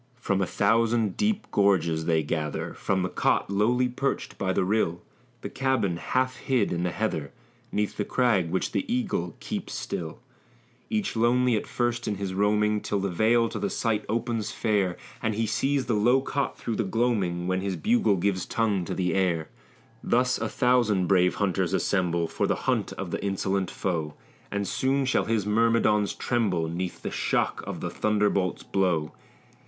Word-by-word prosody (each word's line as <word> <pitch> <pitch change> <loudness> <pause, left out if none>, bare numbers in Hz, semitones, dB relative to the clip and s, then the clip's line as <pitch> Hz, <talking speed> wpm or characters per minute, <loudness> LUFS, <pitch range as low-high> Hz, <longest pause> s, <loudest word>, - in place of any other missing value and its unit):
From 100 -5 0
a 95 - +1
thousand 115 0 +2
deep 215 0 0
gorges 85 -6 +2
they 80 -2 +2
gather, 75 0 -3
From 95 -2 -1
the - - 0
cot - - +1
lowly 120 +5 +2
perched 130 +3 -2
by 95 -1 0
the 95 - +1
rill, 90 -4 0 0.4
The - - -5
cabin 130 -10 0
half 130 +7 -1
hid 125 -10 0
in 85 - -1
the 90 - 0
heather, 85 -8 -2 0.4
'Neath 105 0 -1
the 105 - 0
crag 105 -8 +1
which 95 - -1
the 280 - -2
eagle 200 - -1
keeps - - -5
still; 80 -2 -4 0.7
Each 215 - -1
lonely 120 +1 +3
at 105 - -2
first 120 -1 -1
in 105 - 0
his 95 -1 -4
roaming, 105 +1 +2
Till 100 - -1
the 100 -1 -1
vale 115 +5 +3
to - - -5
the - - -1
sight 110 -2 0
opens 115 -1 -1
fair, 100 -5 0 0.2
And 110 -1 0
he 115 +1 0
sees 135 +5 0
the 120 - 0
low 120 +5 +4
cot 140 +1 -2
through 115 - -3
the 115 - +1
gloaming, 100 -5 0
When 95 +1 0
his 95 -1 -2
bugle 225 - +2
gives 95 0 -1
tongue 105 -5 0
to - - -4
the 90 -1 0
air. 90 -5 0 0.5
Thus 125 +1 +2
a - - -2
thousand 120 -7 +2
brave 90 -1 +3
hunters 100 -4 0
assemble 85 -4 +1
For - - -1
the - - +1
hunt - - +1
of - - -6
the - - -3
insolent 95 -1 -1
foe, 80 -6 -3 0.3
And 100 -1 -2
soon 135 +5 +1
shall 130 - +1
his 110 -3 0
myrmidons 110 -1 +2
tremble 100 -9 0
'Neath 90 +2 -4
the - - -3
shock - - 0
of - - -5
the - - -3
thunderbolt's 105 -3 0
blow. 90 -6 0
105 Hz, 180 wpm, -26 LUFS, 95-120 Hz, 0.7 s, low